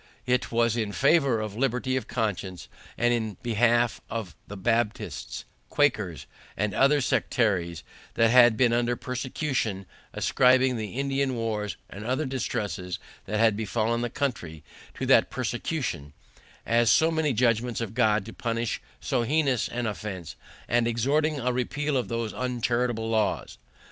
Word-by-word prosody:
It 125 0 0
was 115 -1 +2
in 110 -3 -2
favour 140 -5 +3
of 110 -2 -4
liberty 130 +1 0
of 130 - -2
conscience, 100 -5 -3 0.3
and 120 0 +3
in 110 -4 -2
behalf 120 0 +2
of 110 -8 -5
the 105 - -8
Baptists, 115 +2 -2 0.2
Quakers, 105 - +1 0.3
and 105 -1 0
other 140 +5 +4
sectaries 90 -10 0 0.3
that 115 0 +4
had 120 -2 +7
been 120 -1 +3
under 120 0 +1
persecution, 125 -5 -3 0.3
ascribing 130 0 +3
the 110 -2 -5
Indian 135 -1 0
wars, 110 -3 -2
and 100 +3 -9
other 130 +7 -1
distresses 105 -8 -3 0.3
that 105 +2 -2
had 110 -2 +4
befallen 110 +2 -1
the 120 - -1
country, 95 - -3 0.3
to - - -3
that - - +5
persecution, 70 +1 -3 0.5
as 115 0 +3
so 160 +8 +4
many 160 -2 +1
judgments 120 0 +1
of 115 -3 -4
God 110 -4 +2
to 115 - -9
punish 115 -1 -2 0.2
so 125 - 0
heinous 135 -1 +1
an 120 0 -3
offense, 100 -6 -5 0.3
and 120 0 +2
exhorting 145 +6 +1
a 125 0 0
repeal 145 +4 -1
of 125 - 0
those 115 -2 -3
uncharitable 120 -2 -1
laws. 110 -2 -1
115 Hz, 145 wpm, -27 LUFS, 110-125 Hz, 0.5 s, had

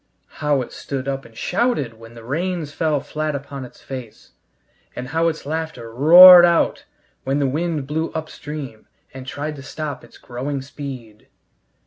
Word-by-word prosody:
How 145 -3 +1
it - - -12
stood 135 -1 -5
up 135 0 -3
and 115 -1 -16
shouted 160 - -1
when 115 +1 -13
the 115 - -11
rains 160 +3 -3
fell 155 -3 0
flat 150 +1 -3
upon 140 -1 -7
its 125 - -13
face! 130 -5 -9 0.6
And 125 0 -6
how 165 +3 +1
its 160 -3 -3
laughter 155 -7 -5
roared 175 +7 +10
out 170 -1 +2 0.4
when 135 +1 -1
the 145 - +1
wind 155 +1 -2
blew 160 +3 -2
upstream 150 -6 -7 0.3
and 130 -1 -9
tried 150 +2 -4
to - - -9
stop 145 -1 -6
its - - -16
growing 130 +3 -5
speed! 130 -6 -9
145 Hz, 160 wpm, -21 LUFS, 130-160 Hz, 0.6 s, roared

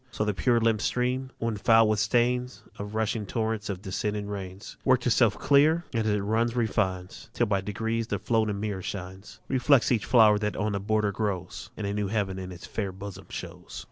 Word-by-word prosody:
So 105 -2 -2
the 105 - 0
pure 120 +4 +2
limped 115 -2 +2
stream, 125 +3 -1
when 115 -2 -2
foul 115 +2 +5
with 105 -1 +1
stains 125 +3 +1 0.2
Of 105 +1 -6
rushing 110 -1 -1
torrents 110 0 -2
and 95 -2 -3
descending 105 +1 -2
rains, 100 -1 -7
Works 130 -2 +3
itself 115 -3 +3
clear, 155 +4 +4
and 115 -2 0
as - - +2
it 105 - -1
runs 115 +3 0
refines, 95 -6 -2
till 120 - +1
by 100 -3 0
degrees 110 +3 -2
the 105 - -1
floating 105 0 0
mirror 100 -2 -3
shines; 95 +1 -7
Reflects 130 0 +3
each 110 -7 +1
flower 110 -3 +6
that 105 -1 -2
on 105 +2 0
the 100 - -1
border 105 0 +1
grows, 95 -3 -4
And 105 - -4
a 100 - -1
new 105 -1 -1
heaven 95 -2 -1
in 95 0 -6
it's 90 -1 -9
fair 100 -3 -3
bosom 95 -1 -9
shows. 90 0 -8
105 Hz, 205 wpm, -27 LUFS, 100-115 Hz, 0.2 s, flower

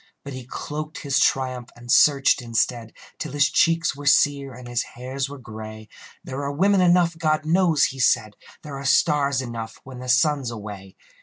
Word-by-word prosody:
But 140 - -8
he 130 -1 -8
cloaked 150 +3 -6
his 140 -1 +1
triumph, 130 -2 0
and 120 0 -7
searched, 140 -3 +4
instead, 115 -1 -1 0.3
Till 155 - -5
his 145 0 +2
cheeks 165 -2 +2
were 145 +1 -7
sere 140 -1 +3
and 125 0 -11
his 120 -1 -1 0.2
hairs 130 +2 -4
were 145 - -8
gray. 110 -3 -10 0.3
"There 130 +2 -6
are 140 0 -3
women 190 +6 +2
enough, 175 -2 +3
God 155 -1 0
knows," 165 -2 +3
he 135 - 0
said.... 115 -5 +2 0.3
"There 145 -3 -7
are - - -7
stars 140 -1 +2
enough 115 -2 -7
when 130 -1 -10
the 125 0 -7
sun's 135 0 +2
away." 100 -4 -9
135 Hz, 180 wpm, -23 LUFS, 120-150 Hz, 0.3 s, searched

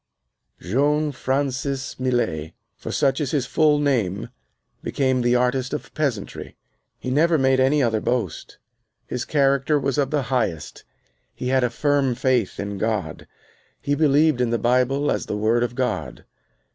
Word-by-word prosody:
Jean 145 +8 +1
Francis 135 0 -2
Millet, 120 -12 -1 0.2
for - - -7
such 135 +1 +1
is 145 - -1
his 140 -3 0
full 150 +2 +3
name, 120 -10 0 0.5
became 130 -2 0
the 120 0 +2
artist 125 +2 0
of - - -8
peasantry. 135 -10 -3 0.4
He 130 - -5
never 160 +4 +3
made 130 -1 +3
any 135 +2 +3
other 110 -3 +1
boast. 115 -9 -3 0.5
His 125 - -4
character 140 0 +2
was 140 +1 -1
of 135 -2 +1
the 145 -2 0
highest. 110 - -2 0.5
He 125 - -3
had 130 -1 +2
a 125 - +2
firm 140 -2 +1
faith 125 -5 0
in 100 -1 -4
God. 110 -2 -2 0.5
He 145 - -1
believed 150 -2 +3
in 125 - +1
the 120 - +1
Bible 130 +4 +1
as - - -2
the 105 - -2
Word 110 +3 +2
of 120 0 -2
God. 130 -1 -3
130 Hz, 155 wpm, -23 LUFS, 120-145 Hz, 0.5 s, full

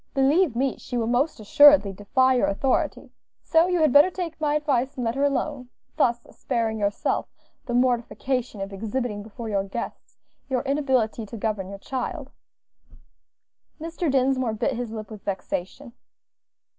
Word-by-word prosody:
Believe 280 +2 +3
me, 265 +2 0
she 245 - -5
will 230 - 0
most 250 +6 0
assuredly 280 -1 +6
defy 260 +7 +2
your 250 - +2
authority; 255 +6 -1 0.3
so 330 +1 +3
you 360 -2 +1
had 310 -4 +3
better 290 +5 +7
take 345 -3 -6
my 295 -1 +1
advice 275 -3 0
and 255 - -4
let 230 - 0
her 275 +2 -1
alone 280 -2 -2 0.3
thus 240 -1 +2
sparing 225 -2 -2
yourself 205 0 -1 0.4
the 240 - -1
mortification 245 -2 0
of 195 +1 -5
exhibiting 215 +1 -3
before 220 +2 -8
your 200 -2 0
guests 200 +4 -7 0.3
your 260 -1 0
inability 265 -6 0
to 230 - -8
govern 210 -3 -2
your 200 - -7
child." 270 - -5 1.5
Mr. 330 +1 -3
Dinsmore 260 -3 +1
bit 245 +4 -1
his 240 -1 -4
lip 215 -1 -7
with 210 -2 -9
vexation. 200 +6 -5
250 Hz, 155 wpm, -24 LUFS, 220-280 Hz, 1.5 s, better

